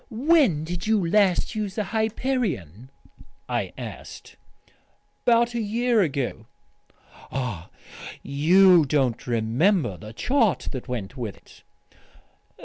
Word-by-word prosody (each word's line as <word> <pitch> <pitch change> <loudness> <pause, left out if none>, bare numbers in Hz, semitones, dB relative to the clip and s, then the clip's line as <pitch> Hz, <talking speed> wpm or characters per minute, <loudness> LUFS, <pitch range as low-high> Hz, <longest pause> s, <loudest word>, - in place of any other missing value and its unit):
"When 255 - +2
did 175 +3 -5
you 210 -5 +2
last 195 +2 +2
use 210 -3 -4
the 215 - -1
Hyperion?" 215 - -2 0.6
I - - -2
asked. - - -9 0.9
"About 235 0 +4
a 235 - -2
year 230 +2 +1
ago." 135 - -2 0.8
"Ah!... 125 -11 -4 0.5
You 175 +5 +5
don't 130 -5 0
remember 120 - +1
the 105 +6 -10
chart 225 - +1
that 130 -1 -7
went 125 -1 -5
with 115 -5 -5
it?" - - -20
175 Hz, 110 wpm, -24 LUFS, -, 0.9 s, You